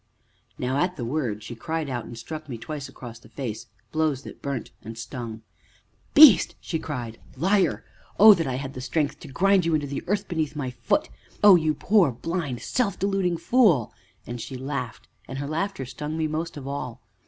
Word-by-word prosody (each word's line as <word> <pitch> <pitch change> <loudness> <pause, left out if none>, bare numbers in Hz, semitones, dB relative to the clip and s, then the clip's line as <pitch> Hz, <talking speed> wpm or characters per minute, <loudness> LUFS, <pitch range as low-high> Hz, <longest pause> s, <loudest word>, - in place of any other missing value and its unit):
Now 130 +2 -1
at 180 +4 +1
the 120 - -4
word 115 -6 -2
she 120 - -7
cried 160 +6 -3
out, 125 -3 -3
and 120 - -9
struck 155 +6 -7
me 120 - -4
twice 140 +4 -6
across 120 -2 -10
the - - -18
face, 120 -6 -5 0.2
blows 155 -4 0
that - - -11
burnt 140 -5 -4
and 115 +1 -9
stung. 115 -1 -6 0.7
"Beast!" 285 - +8
she 160 - -3
cried. 120 -8 -5 0.2
"Liar! 190 +6 +2 0.3
Oh, 215 +1 +11
that 165 -6 -1
I 130 - -1
had 135 +1 -5
the 130 - -7
strength 145 +3 -1
to - - -10
grind 195 +6 +3
you 165 -1 +2
into 150 -2 0
the 140 0 -4
earth 200 +2 0
beneath 160 -4 -2
my 135 -4 -3
foot. 120 -3 0 0.3
Oh! 205 -2 +10
you 155 -3 +2
poor, 195 -8 +3
blind, 145 0 -3
self 230 -7 0
deluding 195 -3 0
fool!" 190 - +3 0.3
and 120 0 -6
she 130 - -6
laughed, 130 -3 -5 0.2
and 135 - -6
her 140 - -3
laughter 165 0 -2
stung 150 +5 -5
me 160 - 0
most 160 +1 -3
of 135 -2 -7
all. 135 -4 -5
145 Hz, 195 wpm, -25 LUFS, 125-170 Hz, 0.7 s, Oh